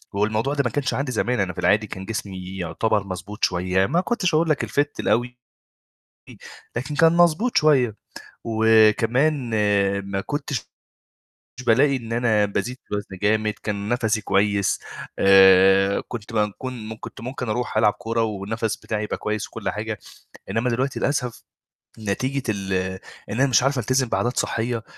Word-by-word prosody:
هو 100 +1 +2
الموضوع 110 +6 -1
ده 140 -1 +1
ما - - +2
كانش 130 +3 -1
عندي 135 -1 -2
زمان، 125 +1 0
أنا 95 -2 -1
في - - -8
العادي 105 +1 +2
كان 95 -1 -7
جسمي 95 -3 -6
يُعتبر 105 +4 0
مضبوط 95 +3 -7
شويّة 90 +1 +2
ما 165 - +1
كنتش 185 -5 -1
أقول 160 +1 +2
لك 155 - +1
الfit 145 +1 0
الأوي. 120 +3 0 1.4
لكن 135 +5 -3
كان 165 +2 +5
مضبوط 175 +8 +3
شويّة 130 -8 +3 0.5
وكمان 115 +5 +3 0.6
ما 95 0 -1
كنتش 140 0 -4 1.0
بالاقي 135 +4 +4
إن 115 -2 -6
أنا 115 -3 +2
بازيد 120 +5 -3
في - - -31
الوزن 100 -2 -4
جامد، 110 +1 +2
كان 100 -1 -3
نَفَسي 110 -3 0
كويّس 100 0 +1 0.4
آآ، 95 0 +6
كنت 115 -2 -7
بم 105 -1 +1
كون 125 -4 -6
م 110 - -6
كنت - - -9
ممكن 125 0 -5
أروح 120 +1 -2
ألعب 105 -1 +4
كورة 115 -1 -2
والنَفَس 110 +1 -3
بتاعي 105 -1 -3
يبقى 105 - -3
كويّس 105 0 -3
وكل - - -5
حاجة، - - -4 0.5
إنّما 120 +3 0
دلوقتي 130 +3 -1
للأسف 125 -4 -2 0.6
نتيجة 130 +7 -2
ال 100 -2 -2 0.6
إن 110 - -3
أنا 140 - +5
مش 125 -2 +3
عارف 135 0 +1
ألتزم 130 +2 +1
بعادات 120 +2 -1
صحّية 115 0 -1
110 Hz, 160 wpm, -23 LUFS, 105-130 Hz, 1.4 s, آآ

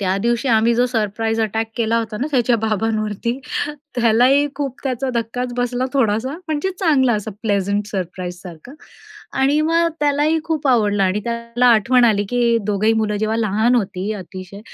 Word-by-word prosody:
त्या 190 -1 0
दिवशी 240 +3 0
आम्ही 230 0 +3
जो 245 +2 +2
सरप्राईज 225 -1 -1
अटॅक 220 +1 -1
केला 230 -1 +1
होता 220 -2 -4
ना 275 - 0
त्याच्या 245 -3 +2
बाबांवरती, 220 +2 -1 0.6
त्यालाही 245 +4 +4
खूप 275 -2 -4
त्याचा 260 0 -1
धक्काच 240 +2 -2
बसला 245 +1 -1
थोडासा. 240 -1 +1 0.2
म्हणजे 310 +4 -1
चांगला 275 -9 +3
असा 210 0 -3
प्लेझंट 200 -1 0
सरप्राईज 180 -2 -5
सारखं 180 - -11 0.7
आणि 280 +3 +3
मग 330 +2 +2
त्यालाही 295 +2 +2
खूप 315 -3 -2
आवडलं. 210 -5 +2
आणि 190 +2 +1
त्याला 235 +1 -1
आठवण 240 +2 +4
आली 210 -3 +3
की 235 -1 +2
दोघंही 210 +1 +2
मुलं 210 -1 -1
जेव्हा 215 +1 -1
लहान 220 +2 +1
होती 200 -3 -1
अतिशय 190 0 -9
230 Hz, 160 wpm, -19 LUFS, 210-250 Hz, 0.7 s, त्यालाही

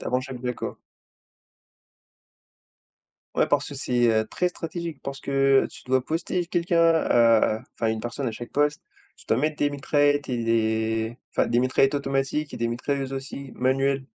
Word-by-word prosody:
Avant 125 - 0
chaque 130 -1 -7
vague 125 -1 -2
quoi. - - -5 2.6
Ouais, - - +4
parce - - +1
que - - -8
c'est, 120 -1 +1
heu, 110 0 +2
très 180 +10 0
stratégique 170 -2 -6
parce 140 0 -5
que 135 -1 +3
tu - - -12
dois 130 0 +1
poster 170 +2 -2
quelqu'un 170 -1 +1
à 115 -6 +4
enfin, 115 - -2
une 110 0 0
personne 120 +4 -4
à 115 - -1
chaque 120 +2 -8
poste, 145 +1 +1 0.3
tu - - -17
dois - - +2
mettre 155 +3 0
des 145 0 +1
mitraillettes 145 0 +1
et 120 -2 -1
des 110 0 0
enfin - - +1
des 120 +1 +2
mitraillettes 130 +2 +2
automatiques 140 +2 -1
et - - -5
des 115 - -1
mitrailleuses 135 +3 -2
aussi 135 0 -6
manuelles 135 +1 +1
135 Hz, 170 wpm, -25 LUFS, 120-145 Hz, 2.6 s, Ouais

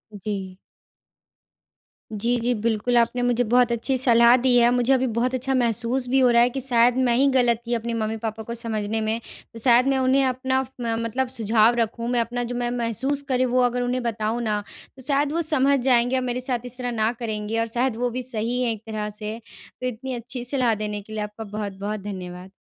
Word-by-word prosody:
जी। 195 -2 -5 1.6
जी, 230 +4 0
जी, 240 +2 0
बिल्कुल 225 +2 0
आपने 235 +1 +2
मुझे 245 0 +2
बहुत 245 +1 +3
अच्छी 245 +3 -1
सलाह 235 -1 +5
दी 250 -2 +4
है। 240 0 +5
मुझे 245 +2 +2
अभी 260 0 +2
बहुत 250 +2 0
अच्छा 265 +2 -2
महसूस 245 +1 +1
भी 270 +1 +3
हो 255 - +5
रहा 235 0 +5
है 245 - +4
कि 270 - -4
शायद 245 -1 +3
मैं 245 -2 +2
ही 265 +3 +3
गलत 245 -3 +3
थी 240 - -1
अपने 235 0 -2
मम्मी-पापा 220 0 -3
को 235 - -6
समझने 220 -2 -3
में। 220 +1 -1 0.3
तो 230 - -8
शायद 245 +2 +5
मैं 270 -1 +2
उन्हें 260 +1 +3
अपना 260 +1 0
फ - - -11
म 230 -1 -1
मतलब 250 +3 -1
सुझाव 230 -1 +3
रखूँ। 230 +1 -2
मैं 245 -1 +1
अपना 245 +1 -3
जो 240 +1 -4
मैं 240 0 -1
महसूस 245 +4 -1
कर 260 - +2
रही 255 - +2
वो 250 0 +2
अगर 245 0 +1
उन्हें 250 +1 -1
बताऊँ 225 0 -2
ना 210 -3 -1 0.3
तो 265 - -13
शायद 285 0 +1
वो 335 - +1
समझ 280 -3 +3
जाएँगे। 245 0 +2
और 255 - +1
मेरे 250 0 -2
साथ 250 -1 -1
इस 245 0 -9
तरह 250 -1 -3
ना 220 -1 +1
करेंगे 220 -1 -3
और 230 - 0
शायद 240 +1 -1
वो 245 0 0
भी 255 +2 -4
सही 240 0 -2
है 235 - +1
एक 220 -1 -6
तरह 215 -1 -4
से 210 +1 -6 0.4
तो 255 - -1
इतनी 255 +2 -5
अच्छी 240 +1 -6
सलाह 250 -3 +1
देने 210 0 -4
के 215 +2 -12
लिए 215 - -3
आपका 210 +2 -7
बहुत-बहुत 205 0 -5
धन्यवाद। 185 -2 -7
235 Hz, 220 wpm, -23 LUFS, 220-255 Hz, 1.6 s, सलाह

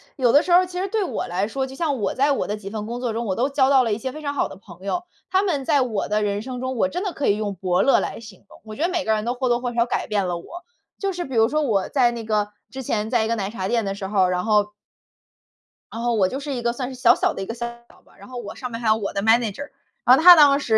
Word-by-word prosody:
有 245 -4 +3
的 290 - +6
时 360 - -3
候 360 +1 +6
其 360 0 -6
实 385 - -1
对 430 +1 -1
我 - - -3
来 185 +3 -1
说， 265 +4 -2
就 265 - -10
像 295 -3 -1
我 - - -1
在 280 +2 +2
我 275 - -1
的 210 - -3
几 200 -2 -8
份 210 0 -5
工 235 +2 -5
作 245 -3 -2
中， 230 +1 -3
我 190 -4 -1
都 255 +6 0
交 270 -1 +2
到 270 -2 +5
了 225 -3 0
一 - - -1
些 255 +3 -4
非 310 - -9
常 285 -1 -3
好 285 - 0
的 - - -11
朋 185 -2 -15
友。 350 - -2 0.3
他 380 +1 +2
们 290 -9 -1
在 280 0 +3
我 225 -5 -1
的 210 0 0
人 205 0 -1
生 250 +2 -6
中， 260 +1 -3
我 275 - +2
真 360 +5 -4
的 385 -4 -3
可 280 - -2
以 205 - +3
用 205 -2 -3
伯 185 0 0
乐 275 - +4
来 - - -4
形 215 -5 -13
容。 - - -16
我 215 -1 -9
觉 295 - -7
得 345 - +2
每 350 -5 -2
个 220 - +2
人 215 0 -1
都 240 - 0
或 255 0 -2
多 240 - +2
或 245 -1 -3
少 235 0 +2
改 - - -2
变 205 -3 0
了 175 -1 -2
我， 345 - -10 0.4
就 395 -1 -1
是 350 -1 -4
比 265 - -7
如 225 0 +5
说 305 0 0
我 210 -9 0
在 250 -4 +3
那 235 -1 -6
个 210 -1 0 0.2
之 265 0 -7
前 215 -3 -2
在 240 -2 +2
一 - - -2
个 230 - 0
奶 200 -3 -3
茶 190 -4 -4
店 230 0 0
的 195 - -2
时 195 -1 -5
候， 190 -2 +2
然 180 0 -1
后 210 -2 +3 1.3
然 230 - -6
后 240 0 0
我 200 -4 +3
就 260 +8 -4
是 285 0 -5
一 245 - -3
个 235 0 0
算 250 0 -4
是 260 - -8
小 245 - +6
小 - - 0
的 - - -6
一 - - -3
个 225 - -5
Sale 235 0 -9
吧， - - -24
然 - - -14
后 255 -1 -8
我 215 -4 -7
上 250 -2 -6
面 230 - -5
还 235 - -3
有 215 - +5
我 210 -3 -4
的 200 - -1
Manager。 225 +4 +1 0.4
然 250 - +8
后 270 - +1
他 355 +1 +11
当 285 -3 +6
时 225 -6 +2
235 Hz, 375 characters per minute, -22 LUFS, 210-275 Hz, 1.3 s, 他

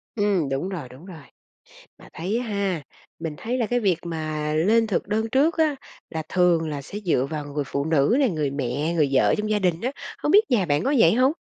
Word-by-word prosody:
Ừm, 200 -8 +1
đúng 135 +7 -2
rồi, 165 -10 -6
đúng 130 +6 -14
rồi. 165 -5 -10 0.8
Mà - - -16
thấy 195 +8 -2
ha, 200 -8 -2 0.4
mình 160 -2 -4
thấy 245 +3 -3
là 240 - +1
cái 245 +3 0
việc 195 -7 +2
mà 155 -2 -3
lên 220 +8 +3
thực 200 - -1
đơn 220 +2 -1
trước 295 +8 +2
á, 310 -3 +2 0.3
là 160 -1 -4
thường 175 -3 +2
là 145 -2 -4
sẽ 205 +9 -7
dựa 165 -10 +1
vào 150 -2 -4
người 145 0 -3
phụ 140 +1 -2
nữ 160 - +3
nè, 270 - +3
người 150 -6 -1
mẹ, 140 +4 -2
người 150 -5 +2
vợ 130 - +4
trong 215 0 -2
gia 210 -1 +1
đình 180 -3 0
á, 255 +3 -1 0.3
không 295 - -1
biết 415 - +8
nhà 205 -6 +3
bạn 145 +2 +1
có 275 - +1
vậy - - +6
hông? 255 +4 +4
180 Hz, 230 wpm, -24 LUFS, 150-220 Hz, 0.8 s, biết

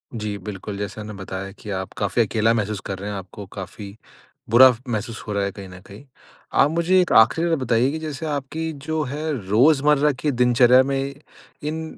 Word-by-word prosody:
जी 105 -2 -4
बिल्कुल। 100 +1 -7
जैसा 105 +1 -5
आपने 105 0 -7
बताया 95 0 -6
कि 105 +1 -12
आप 95 -1 -4
काफ़ी 100 +4 +1
अकेला 110 0 +2
महसूस 110 -2 -2
कर 95 -1 -5
रहे 100 - -5
हैं, 100 - -4
आपको 95 +2 -9
काफ़ी 100 +1 -8 0.5
बुरा 130 +3 +8 0.2
महसूस 115 0 -4
हो 105 - -3
रहा 100 0 0
है 100 - -2
कहीं 100 -1 -10
न 90 0 -11
कहीं। 100 +8 -13 0.5
आप 140 - +4
मुझे 170 +3 +3
एक 180 - -1
आखरी 120 +9 +5
बात 165 - +2
बताइए 125 +1 +1
की 160 - -4
जैसे 155 -1 -5
आपकी 155 +2 -3 0.2
जो 160 0 0
है 150 +3 -4 0.2
रोज़मर्रा 145 +6 +4
की 150 - +1
दिनचर्या 125 0 +5
में 135 0 -2 0.5
इन 155 +2 -3
115 Hz, 195 wpm, -22 LUFS, 100-145 Hz, 0.5 s, बुरा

